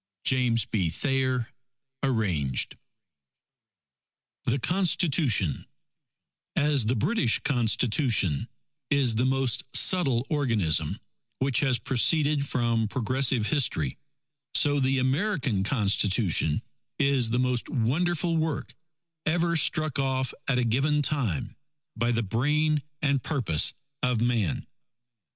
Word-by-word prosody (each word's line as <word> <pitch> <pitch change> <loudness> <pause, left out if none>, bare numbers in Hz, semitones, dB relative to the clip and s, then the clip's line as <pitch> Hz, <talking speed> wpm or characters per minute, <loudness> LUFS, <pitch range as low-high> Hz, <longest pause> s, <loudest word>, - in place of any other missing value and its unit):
James 125 -3 +2
B. 95 -6 -1
Thayer 130 - -1 0.5
(Arranged) 95 - 0 1.7
THE 120 - +1
CONSTITUTION 150 - +1 0.9
_As 145 -6 +2
the 125 - +1
British 125 - +1
Constitution 115 - +1 0.4
is 135 -5 +2
the 120 +4 +1
most 135 -2 0
subtile 135 -10 +3
organism, 105 - 0 0.4
which 130 -3 +1
has 130 -4 +2
proceeded 145 +4 +1
from 115 -3 0
progressive 130 +1 0
history; 105 - -1 0.6
so 145 0 +5
the 135 0 +1
American 135 - 0
Constitution 100 - +1 0.3
is 140 -4 +2
the 120 - 0
most 125 -1 -1
wonderful 165 +6 0
work 160 -2 -2 0.5
ever 170 +1 +1
struck 155 -2 +1
off 130 -1 -1
at 135 - +1
a 125 - +1
given 140 +6 +1
time, 125 - -1 0.4
by 120 +1 0
the 115 0 0
brain 150 +8 +1 0.2
and 140 -2 +1
purpose 115 - +1 0.3
of 125 -2 0
man. 115 -7 0
130 Hz, 105 wpm, -26 LUFS, 115-145 Hz, 1.7 s, so